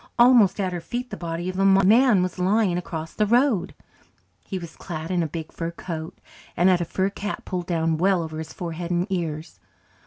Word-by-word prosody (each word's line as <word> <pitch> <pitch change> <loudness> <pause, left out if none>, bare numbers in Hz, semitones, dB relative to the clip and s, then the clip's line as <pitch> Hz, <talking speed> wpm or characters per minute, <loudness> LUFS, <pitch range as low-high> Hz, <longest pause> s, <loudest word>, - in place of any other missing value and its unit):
Almost 235 -6 +6
at 185 -2 -1
her 175 - -4
feet 245 +6 -5
the - - -3
body 170 -1 -4
of 185 +1 -3
a - - +3
man 195 +2 +5
was 185 0 -4
lying 190 0 +2
across 165 -2 -5
the 215 - +1
road. 235 -5 +2 0.7
He 190 - -5
was 170 -3 -8
clad 165 -1 -6
in 180 -1 +1
a 165 - 0
big 160 +1 -6
fur 165 0 -4
coat, 165 -1 -7 0.4
and 180 +2 +5
had 180 -1 +3
a - - -1
fur 190 +4 -1
cap 205 +1 -5
pulled 180 -1 -4
well 170 -2 0 0.2
down - - -5
over 170 -5 +1
his 160 - -7
forehead 170 0 -5
and 175 0 +1
ears. 160 -3 -4
180 Hz, 210 wpm, -24 LUFS, 170-195 Hz, 0.7 s, Almost